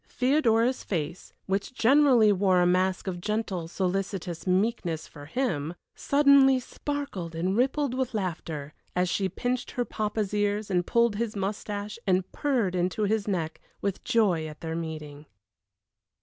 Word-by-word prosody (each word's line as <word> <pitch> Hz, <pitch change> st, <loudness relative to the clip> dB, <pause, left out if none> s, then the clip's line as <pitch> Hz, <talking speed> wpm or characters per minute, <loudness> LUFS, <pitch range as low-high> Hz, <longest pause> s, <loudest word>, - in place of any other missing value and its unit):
Theodora's 250 Hz, -2 st, +2 dB
face, 170 Hz, -2 st, -4 dB
which 195 Hz, +6 st, -2 dB
generally 250 Hz, -4 st, +5 dB
wore 190 Hz, -1 st, +3 dB
a 175 Hz, -, +4 dB
mask 185 Hz, +1 st, +2 dB
of 180 Hz, -2 st, -4 dB
gentle, 205 Hz, -5 st, -2 dB
solicitous 185 Hz, -1 st, -3 dB
meekness 185 Hz, -4 st, 0 dB
for 145 Hz, -2 st, -12 dB
him, 170 Hz, -, -1 dB, 0.2 s
suddenly 280 Hz, -2 st, +5 dB
sparkled 250 Hz, -, -5 dB
and 180 Hz, +4 st, 0 dB
rippled 265 Hz, +2 st, +1 dB
with 260 Hz, -2 st, -2 dB
laughter, 160 Hz, -6 st, -4 dB, 0.2 s
as 180 Hz, 0 st, +2 dB
she 190 Hz, 0 st, 0 dB
pinched 245 Hz, +6 st, -2 dB
her 245 Hz, -, -2 dB
papa's 210 Hz, -2 st, -2 dB
ears, 205 Hz, 0 st, 0 dB
and 180 Hz, -1 st, +1 dB
pulled 235 Hz, -3 st, +2 dB
his 225 Hz, -1 st, -2 dB
mustache, 205 Hz, +2 st, -4 dB
and 185 Hz, -1 st, +1 dB
purred 250 Hz, -11 st, 0 dB
into 185 Hz, +4 st, 0 dB
his 210 Hz, 0 st, 0 dB
neck, 165 Hz, -5 st, -2 dB, 0.2 s
with 200 Hz, -2 st, -3 dB
joy 185 Hz, -9 st, +2 dB
at 155 Hz, 0 st, -10 dB
their 160 Hz, -1 st, -3 dB
meeting. 155 Hz, -3 st, -6 dB
200 Hz, 145 wpm, -27 LUFS, 175-235 Hz, 0.2 s, generally